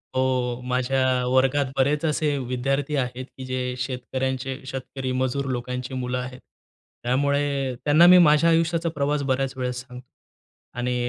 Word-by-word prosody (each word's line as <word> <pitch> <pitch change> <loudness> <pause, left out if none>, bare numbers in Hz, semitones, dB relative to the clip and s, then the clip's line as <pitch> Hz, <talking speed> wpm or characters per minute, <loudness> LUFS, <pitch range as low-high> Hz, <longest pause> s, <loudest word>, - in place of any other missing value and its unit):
हो, 125 -1 0
माझ्या 125 0 +1
वर्गात 130 +2 +3
बरेच 145 +3 +2
असे 150 -1 0
विद्यार्थी 135 +3 -1
आहेत, 130 -1 -2
की 130 - -7
जे 130 -1 -3
शेतकऱ्यांचे, 130 +1 -3
शेतकरी-मजूर 130 0 -3
लोकांची 125 +1 -4
मुलं 125 0 -2
आहेत. 125 0 -6 0.6
त्यामुळे 140 +1 0
त्यांना 150 +3 +6
मी 180 +1 +9
माझ्या 160 -1 +5
आयुष्याचा 165 0 +2
प्रवास 145 0 0
बऱ्याच 135 0 0
वेळेस 125 -1 -2
सांगतो 125 0 -12 0.7
आणि 125 0 -1
130 Hz, 130 wpm, -24 LUFS, 125-140 Hz, 0.7 s, मी